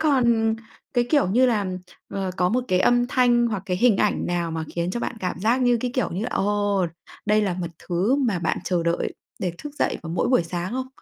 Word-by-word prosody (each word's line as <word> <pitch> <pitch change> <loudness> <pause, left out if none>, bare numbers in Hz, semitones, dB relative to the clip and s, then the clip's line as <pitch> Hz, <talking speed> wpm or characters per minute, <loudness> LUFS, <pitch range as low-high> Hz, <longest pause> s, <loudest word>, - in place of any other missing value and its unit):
còn 235 -7 +3 0.4
cái, 240 0 +3
kiểu 285 - +4
như 250 +6 +4
là, 210 -5 +1 0.4
ờ, 190 -1 -3
có 180 0 +2
một 250 +4 0
cái 185 0 +2
âm 245 +2 +4
thanh 240 -2 +3
hoặc 210 -4 -2
cái 180 - 0
hình 225 0 +4
ảnh 210 - +1
nào 175 -1 -1
mà 160 0 -3
khiến 170 +1 -1
cho 235 - -3
bạn 235 - -3
cảm 180 -2 -2
giác 235 +6 +2
như, 245 -1 +4
cái 250 - -1
kiểu 255 - 0
như, 195 +6 -3
ồ, 205 -2 +1 0.4
đây 210 0 +3
là 190 -4 0
một 175 -1 -3
thứ 190 +10 0
mà 235 -10 +1
bạn 165 -2 -1
chờ 175 -1 0
đợi 170 0 -1 0.2
để 180 -2 -2
thức 295 -1 -8
dậy - - 0
vào 165 - -6
mỗi 175 - 0
buổi 250 -9 +4
sáng 175 +4 -4
không? 260 0 -3
205 Hz, 235 wpm, -24 LUFS, 180-245 Hz, 0.4 s, kiểu